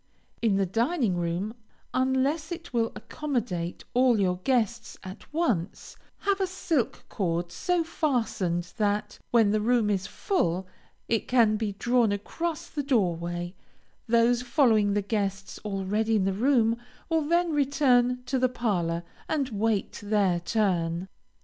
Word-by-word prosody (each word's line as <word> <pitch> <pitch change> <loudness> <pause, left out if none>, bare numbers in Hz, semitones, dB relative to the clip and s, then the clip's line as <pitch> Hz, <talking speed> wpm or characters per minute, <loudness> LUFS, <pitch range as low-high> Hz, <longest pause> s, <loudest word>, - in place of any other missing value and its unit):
In 220 -4 +3
the 195 0 +2
dining 230 - +1
room, 175 +5 -2 0.4
unless 265 +5 +1
it 340 -3 -7
will 230 -1 +1
accommodate 215 - -3
all 250 -2 +4
your 180 -2 +1
guests 235 +2 -1
at 190 0 -10
once, 240 - -1 0.3
have 395 -1 +1
a 380 - +2
silk 340 -8 -1
cord 175 -2 -2
so 355 - 0
fastened 225 - -1
that, 210 -1 -1
when 225 -4 +4
the 215 0 +1
room 225 -2 +2
is 195 -1 -1
full, 190 - -1 0.4
it 225 -2 0
can 230 -4 +4
be 210 -2 -2
drawn 240 +1 +2
across 315 +11 -3
the 295 - -3
door 225 -11 +2
way; 175 +1 -4 0.5
those 235 +1 +3
following 235 -5 +3
the 205 - +1
guests 195 -2 -2
already 210 +2 0
in 205 - +2
the 195 - +1
room, 230 +1 +3 0.3
will 325 -1 +2
then 340 +3 +1
return 255 -4 +2
to 260 +1 0
the 255 0 +3
parlor, 175 -9 -1 0.3
and 285 -4 0
wait 215 -2 -1
their 205 -4 +2
turn. 175 -3 0
225 Hz, 145 wpm, -27 LUFS, 195-260 Hz, 0.5 s, all